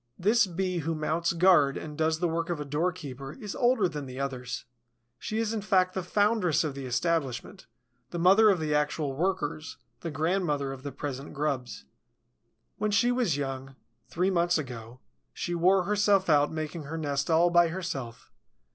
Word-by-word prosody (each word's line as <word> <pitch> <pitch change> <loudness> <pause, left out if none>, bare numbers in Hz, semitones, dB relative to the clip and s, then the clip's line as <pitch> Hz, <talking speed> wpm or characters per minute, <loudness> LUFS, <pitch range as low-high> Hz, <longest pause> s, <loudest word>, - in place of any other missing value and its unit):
This 215 +4 +3
Bee 185 0 -2
who 165 +1 -2
mounts 160 +2 0
guard 170 -5 +4
and 150 -1 -7
does 160 0 +1
the 175 +2 0
work 165 +1 -2
of 170 -3 -2
a 150 - -4
doorkeeper 145 -3 -3
is 210 -2 -7
older 240 -5 +3
than 150 -4 -6
the 130 +1 -8
others. 130 -2 -4 0.5
She 215 - -4
is 225 -1 0
in 220 - -2
fact 185 -2 +2
the 190 - -2
foundress 195 -3 +2
of 150 -3 -2
the 135 -1 -6
establishment, 160 +5 -2 0.4
the 175 - -5
mother 195 +6 +6
of 190 -4 +3
the 155 -1 -1
actual 150 -1 0
workers, 160 -2 -2 0.2
the 170 - -5
grandmother 155 -3 0
of 135 -1 -8
the 140 +1 -6
present 135 0 -6
grubs. 135 - -3 0.9
When 215 +1 0
she 240 +4 +3
was 240 - +1
young, 135 -1 -5 0.3
three 180 +3 0
months 175 -1 +2
ago, 125 -3 -7 0.3
she 175 - -3
wore 180 +2 +3
herself 200 -2 +2
out 145 -1 +4
making 155 0 -5
her 160 +3 -5
nest 145 -2 -2
all 170 +2 +4
by 175 0 +5
herself. 160 -10 -6
165 Hz, 175 wpm, -28 LUFS, 140-185 Hz, 0.9 s, mother